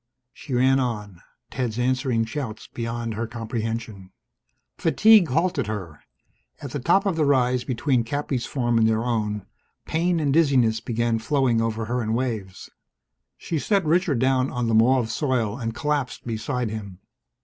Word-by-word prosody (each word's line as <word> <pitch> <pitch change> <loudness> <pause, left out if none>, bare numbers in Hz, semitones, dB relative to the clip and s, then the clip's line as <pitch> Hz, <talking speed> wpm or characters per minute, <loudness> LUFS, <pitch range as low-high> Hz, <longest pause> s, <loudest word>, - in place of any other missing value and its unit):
She 135 -5 -6
ran 130 +2 +4
on, 105 -8 -3 0.3
Ted's 120 -4 -3
answering 125 -2 +1
shouts 115 -2 -5
beyond 115 -1 -4
her 115 +2 -3
comprehension. 115 -3 -5 0.7
Fatigue 215 -5 +5
halted 165 - 0
her. 95 -8 -6 0.6
At 140 - -7
the 145 - -3
top 175 +10 +3
of 195 -4 +1
the 160 - +1
rise 125 -3 +2
between 130 -1 0
Cappy's 135 0 -2
farm 120 -4 0
and 110 0 +4
their 110 0 +1
own, 105 -4 -2 0.4
pain 170 +2 0
and 145 -3 +1
dizziness 130 -8 +3
began 115 -1 -1
flowing 125 -1 +1
over 115 0 -2
her 120 +2 -1
in 110 0 -1
waves. 110 -7 -4 0.7
She 165 - -3
set 195 +2 +1
Richard 165 -3 +2
down 130 +1 +2
on 125 -1 -2
the 115 - 0
mauve 115 +1 +3
soil 125 -8 0
and 115 -2 -3
collapsed 145 -4 -2
beside 120 +1 -2
him. 100 -4 -7
120 Hz, 155 wpm, -24 LUFS, 110-140 Hz, 0.7 s, Fatigue